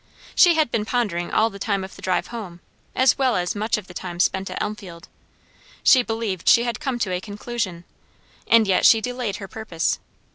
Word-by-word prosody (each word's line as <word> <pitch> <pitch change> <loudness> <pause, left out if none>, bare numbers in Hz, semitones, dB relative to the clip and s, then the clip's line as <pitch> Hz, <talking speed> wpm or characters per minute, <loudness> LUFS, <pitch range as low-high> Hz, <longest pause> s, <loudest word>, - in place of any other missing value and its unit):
She 350 -2 +6
had 310 -6 +1
been 215 - 0
pondering 210 -7 -1
all 225 +1 +2
the 200 - -10
time 200 -2 -1
of 190 - -9
the - - -13
drive 185 -1 -1
home, 205 -7 -7 0.4
as 260 +1 +3
well 260 -3 +2
as 180 -1 -1
much 215 +2 -1
of 210 - -8
the 180 - -13
time 175 -1 -7
spent 190 +1 +1
at - - -5
Elmfield; 190 -5 -6 0.8
she 260 - +6
believed 225 -6 -2
she 235 - +6
had 240 -1 -3
come 265 -3 -2
to 215 -6 -2
a 180 - -2
conclusion; 205 -4 -5 0.6
and 230 -1 +5
yet 190 -2 +2
she 225 - +7
delayed 245 -2 -3
her 195 - -7
purpose. 190 -6 -2
210 Hz, 205 wpm, -22 LUFS, 185-235 Hz, 0.8 s, she